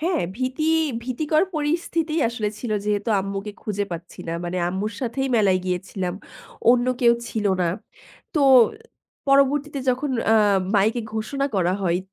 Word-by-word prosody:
হ্যাঁ, 335 Hz, -1 st, 0 dB
ভীতি 260 Hz, +4 st, -2 dB, 0.4 s
ভীতিকর 300 Hz, +6 st, +1 dB
পরিস্থিতি 315 Hz, +1 st, -1 dB
আসলে 225 Hz, -3 st, -2 dB
ছিলো। 220 Hz, -1 st, -2 dB
যেহেতু 205 Hz, +1 st, -1 dB
আম্মুকে 195 Hz, +2 st, -5 dB
খুঁজে 205 Hz, -1 st, -2 dB
পাচ্ছি 170 Hz, +1 st, -8 dB
না -, -, -1 dB
মানে 175 Hz, +1 st, -3 dB
আম্মুর 195 Hz, +4 st, -3 dB
সাথেই 270 Hz, +2 st, -2 dB
মেলায় 195 Hz, -4 st, +3 dB
গিয়েছিলাম 180 Hz, 0 st, -3 dB, 0.6 s
অন্য 245 Hz, 0 st, +3 dB
কেউ 235 Hz, -1 st, +6 dB, 0.2 s
ছিলো 210 Hz, -3 st, 0 dB
না। 175 Hz, -, +2 dB, 0.7 s
তো 305 Hz, -, +2 dB, 0.9 s
পরবর্তীতে 275 Hz, +1 st, +3 dB
যখন 255 Hz, +3 st, -2 dB, 0.2 s
আ -, -, +6 dB, 0.4 s
মাইকে 215 Hz, +4 st, +3 dB
ঘোষণা 275 Hz, +6 st, -1 dB
করা 180 Hz, -1 st, +2 dB
হয় 175 Hz, -1 st, +1 dB
230 Hz, 140 wpm, -23 LUFS, 195-275 Hz, 0.9 s, কেউ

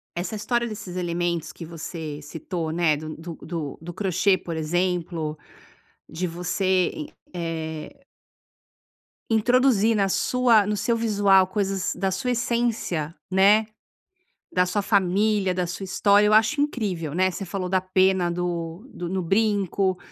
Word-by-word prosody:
essa 180 Hz, +5 st, -3 dB
história 235 Hz, +3 st, 0 dB
desses 210 Hz, -5 st, -7 dB
elementos 170 Hz, -2 st, -1 dB
que 165 Hz, -, -9 dB
você 160 Hz, -2 st, -6 dB
citou, 160 Hz, +2 st, -4 dB
né, 165 Hz, -2 st, +2 dB
do 155 Hz, +1 st, -7 dB
do 165 Hz, +1 st, -7 dB
do 160 Hz, -4 st, -5 dB
do 175 Hz, +1 st, -7 dB
crochê, 190 Hz, +1 st, +2 dB
por 170 Hz, -2 st, -6 dB
exemplo, 165 Hz, -1 st, -1 dB, 0.7 s
de 180 Hz, +3 st, -3 dB
você 180 Hz, +2 st, 0 dB
i 305 Hz, -2 st, -6 dB, 0.3 s
eh 160 Hz, -, -5 dB, 1.3 s
introduzir 230 Hz, -1 st, +3 dB
na 200 Hz, -2 st, +2 dB
sua 235 Hz, 0 st, +3 dB
no 210 Hz, -, 0 dB
seu 230 Hz, +4 st, +1 dB
visual, 200 Hz, -4 st, +4 dB
coisas 195 Hz, -1 st, -1 dB
da 195 Hz, +1 st, -1 dB
sua 250 Hz, +7 st, -2 dB
essência, 230 Hz, -10 st, -1 dB, 0.2 s
né, 200 Hz, +3 st, +5 dB, 0.9 s
da 180 Hz, 0 st, +3 dB
sua 205 Hz, +3 st, 0 dB
família, 200 Hz, 0 st, +2 dB
da 180 Hz, -1 st, -1 dB
sua 175 Hz, +3 st, -5 dB
história, 200 Hz, +2 st, +4 dB
eu 210 Hz, -, +4 dB
acho 225 Hz, +7 st, +4 dB
incrível, 195 Hz, -, -2 dB
né. 185 Hz, +2 st, +3 dB
Você 195 Hz, +2 st, -6 dB
falou 185 Hz, 0 st, -3 dB
da 190 Hz, 0 st, +3 dB
pena 185 Hz, -1 st, +2 dB
do 175 Hz, +3 st, -3 dB
do 175 Hz, -, -5 dB
no 190 Hz, +1 st, -1 dB
brinco. 195 Hz, -1 st, +1 dB
185 Hz, 145 wpm, -24 LUFS, 170-210 Hz, 1.3 s, né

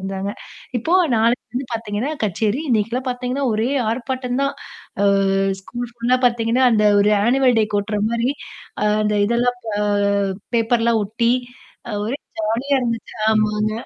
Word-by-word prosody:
இருந்தாங்க. 195 Hz, +1 st, -4 dB, 0.5 s
இப்போ 320 Hz, +10 st, -2 dB, 0.2 s
நாளைக்கு 230 Hz, +2 st, +2 dB
வந்து 255 Hz, +1 st, -2 dB
பாத்தீங்கன்னா, 225 Hz, +4 st, -3 dB
கச்சேரி. 215 Hz, -, 0 dB
இன்னைக்குல்லாம் 235 Hz, +3 st, 0 dB
பாத்தீங்கன்னா, 250 Hz, +2 st, -2 dB
ஒரே 220 Hz, +3 st, 0 dB, 0.2 s
ஆர்ப்பாட்டம் 255 Hz, +1 st, -3 dB
தான். 275 Hz, 0 st, 0 dB, 0.5 s
அ -, -, +3 dB, 0.6 s
ஸ்கூல் 240 Hz, +4 st, -6 dB
ஃபுல்லா 240 Hz, +2 st, +1 dB
பாத்தீங்கன்னா, 235 Hz, +1 st, +2 dB
அந்த 210 Hz, -1 st, +3 dB, 0.2 s
ஒரு 210 Hz, +1 st, +3 dB
ஆனுவல் 255 Hz, 0 st, +3 dB
டேக்கு 210 Hz, -1 st, +1 dB
ஒட்டுற 210 Hz, +1 st, -3 dB
மாரி, 235 Hz, +2 st, 0 dB, 0.7 s
அந்த 210 Hz, 0 st, +1 dB
இதெல்லாம் 245 Hz, +2 st, +1 dB, 0.2 s
அ -, -, 0 dB, 0.8 s
பேப்பர்லாம் 230 Hz, 0 st, +2 dB
ஒட்டி 230 Hz, +3 st, +1 dB, 0.6 s
அ -, -, -5 dB
ஒரே 255 Hz, +5 st, -2 dB, 0.2 s
ஜாலியா 230 Hz, +6 st, 0 dB
இருந்துச்சு. 230 Hz, -2 st, -3 dB, 0.2 s
ஆமாங்க. 215 Hz, 0 st, +1 dB
235 Hz, 135 wpm, -20 LUFS, 215-250 Hz, 0.8 s, அ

